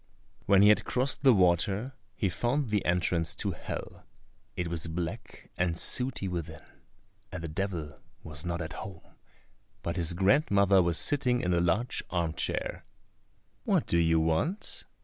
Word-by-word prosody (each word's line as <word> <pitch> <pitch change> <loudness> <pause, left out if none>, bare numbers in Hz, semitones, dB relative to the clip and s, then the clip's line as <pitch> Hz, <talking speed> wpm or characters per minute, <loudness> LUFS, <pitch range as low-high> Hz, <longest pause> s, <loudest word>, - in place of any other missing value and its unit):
When 100 0 +6
he 105 - +7
had 105 - +4
crossed 130 +2 0
the 135 -1 +6
water 95 +5 +2 0.2
he 100 - 0
found 120 - -1
the 105 -2 +1
entrance 85 -1 0
to - - -2
Hell. - - -7 0.5
It 90 - -2
was 85 -1 -4
black 85 +7 -6
and 85 -2 0
sooty 125 -3 -1
within, 85 -3 -5 0.7
and 90 -2 -6
the - - -3
Devil 80 -5 -4 0.2
was 75 -1 -4
not 85 -1 -2
at 80 - -7
home, 95 -5 -8 0.8
but 85 +1 -3
his 85 0 +1
grandmother 100 - +4
was 85 -2 +1
sitting 125 -4 +2
in 90 0 0
a 85 - +3
large 105 +8 0
arm 85 -3 -1
chair. - - -3 0.8
"What - - +2
do 85 - +2
you 80 -1 +3
want?" 80 - 0
90 Hz, 155 wpm, -29 LUFS, 85-105 Hz, 0.8 s, he